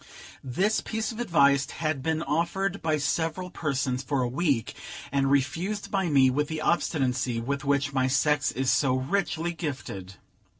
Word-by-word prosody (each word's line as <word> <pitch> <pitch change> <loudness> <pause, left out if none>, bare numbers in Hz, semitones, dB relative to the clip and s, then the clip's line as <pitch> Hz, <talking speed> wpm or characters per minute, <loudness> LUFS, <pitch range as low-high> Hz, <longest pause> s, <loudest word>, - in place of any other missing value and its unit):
This 190 - +1
piece 220 +1 -3
of 225 - -8
advice 140 -10 +3
had 155 -4 -2
been 160 +3 -1
offered 175 +5 -1
by 155 -1 +1
several 165 +5 -1
persons 135 -4 -1
for 135 0 -1
a - - 0
week, 135 -3 0 0.4
and 135 0 +2
refused 165 +10 0
by 195 -3 +1
me 135 -3 +5
with 150 +3 0
the 160 0 -4
obstinacy 130 -7 0
with 135 +4 -3
which 140 0 +1
my 130 -1 +2
sex 145 +2 +2
is 130 -1 0
so 130 +1 +2
richly 170 +4 -1
gifted. 130 - -6
145 Hz, 160 wpm, -27 LUFS, 130-170 Hz, 0.4 s, me